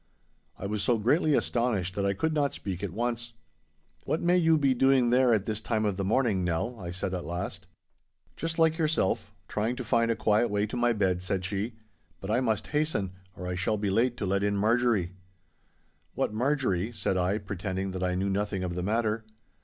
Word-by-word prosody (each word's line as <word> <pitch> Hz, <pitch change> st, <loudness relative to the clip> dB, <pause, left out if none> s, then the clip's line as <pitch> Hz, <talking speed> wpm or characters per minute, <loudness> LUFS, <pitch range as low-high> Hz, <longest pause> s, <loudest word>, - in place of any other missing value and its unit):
I -, -, -6 dB
was 105 Hz, +1 st, -2 dB
so 120 Hz, +2 st, +2 dB
greatly 145 Hz, +7 st, +3 dB
astonished 110 Hz, -10 st, 0 dB
that 100 Hz, 0 st, 0 dB
I 100 Hz, -, +2 dB
could 160 Hz, +10 st, 0 dB
not 145 Hz, -2 st, +1 dB
speak 95 Hz, -3 st, -5 dB
at 100 Hz, -, -2 dB
once. 120 Hz, +4 st, -3 dB, 0.7 s
'What 160 Hz, -, 0 dB
may 175 Hz, +1 st, +3 dB
you 165 Hz, -3 st, +4 dB
be 140 Hz, -3 st, +3 dB
doing 130 Hz, -1 st, +4 dB
there 125 Hz, 0 st, +5 dB
at 105 Hz, -3 st, +2 dB
this 110 Hz, 0 st, -3 dB
time 110 Hz, -1 st, 0 dB
of 100 Hz, -2 st, 0 dB
the 100 Hz, -, -2 dB
morning, 105 Hz, -2 st, +2 dB
Nell?' 90 Hz, +8 st, -1 dB
I 90 Hz, -2 st, -6 dB
said 95 Hz, +1 st, -3 dB
at 90 Hz, -1 st, -3 dB
last. 90 Hz, +2 st, -5 dB, 0.7 s
'Just 165 Hz, 0 st, -3 dB
like 160 Hz, 0 st, +3 dB
yourself—trying 120 Hz, -5 st, -1 dB
to 125 Hz, -, -5 dB
find 115 Hz, 0 st, +2 dB
a 115 Hz, -, +2 dB
quiet 110 Hz, +2 st, +2 dB
way 105 Hz, 0 st, +1 dB
to 110 Hz, -, -6 dB
my 120 Hz, 0 st, +2 dB
bed,' 95 Hz, -5 st, +1 dB
said 95 Hz, 0 st, -2 dB
she; 100 Hz, +4 st, -3 dB, 0.4 s
'but 95 Hz, -, -4 dB
I 120 Hz, -, +3 dB
must 110 Hz, -5 st, 0 dB
hasten, 150 Hz, -, 0 dB, 0.2 s
or 90 Hz, -, -7 dB
I 90 Hz, -, -2 dB
shall 105 Hz, +4 st, 0 dB
be 100 Hz, -1 st, -1 dB
late 120 Hz, +4 st, +2 dB
to 105 Hz, -, -2 dB
let 100 Hz, +1 st, +1 dB
in 100 Hz, 0 st, +1 dB
Marjorie.' 110 Hz, -4 st, +2 dB, 1.0 s
'What -, -, 0 dB
Marjorie,' 120 Hz, -5 st, 0 dB
said 95 Hz, -, -1 dB
I, 95 Hz, +3 st, +1 dB
pretending 95 Hz, -1 st, -4 dB
that 95 Hz, -1 st, -5 dB
I 90 Hz, 0 st, 0 dB
knew 95 Hz, +2 st, 0 dB
nothing 100 Hz, -1 st, -1 dB
of 90 Hz, -1 st, -2 dB
the 90 Hz, -, -3 dB
matter. 110 Hz, +2 st, 0 dB
105 Hz, 205 wpm, -28 LUFS, 95-120 Hz, 1.0 s, there